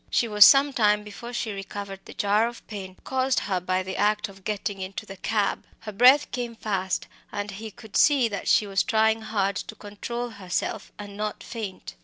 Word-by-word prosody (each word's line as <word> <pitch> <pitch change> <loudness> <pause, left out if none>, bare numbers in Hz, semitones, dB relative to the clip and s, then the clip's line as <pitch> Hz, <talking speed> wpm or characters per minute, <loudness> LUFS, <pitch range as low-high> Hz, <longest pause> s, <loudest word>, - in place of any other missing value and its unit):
She 235 - +2
was 210 -2 +8
some 280 0 +6
time 210 -3 +3
before 210 +3 -9
she 235 -2 -2
recovered 195 0 -6
the - - -11
jar 210 +3 +2
of 240 0 -9
pain 190 -3 -8
caused 260 0 +1
her 190 -2 -1
by 185 +1 -1
the 190 0 -5
act 210 0 +1
of 195 -1 -15
getting 200 -1 -3
into 190 +1 -5
the 195 - -9
cab. 205 +1 0 0.2
Her 215 - -6
breath 250 +7 +6
came 240 -2 -4
fast, 190 -4 -2 0.3
and 205 0 -4
he 215 +3 -7
could 220 0 -14
see 280 -5 +5
that 200 -3 -5
she 215 - +4
was 195 -1 +1
trying 220 0 +2
hard 200 -3 -1
to 220 - -6
control 235 +4 -5
herself 200 0 -4
and 205 -1 -9
not 210 +1 -4
to - - -11
faint. 210 - -6
210 Hz, 205 wpm, -26 LUFS, 195-225 Hz, 0.3 s, was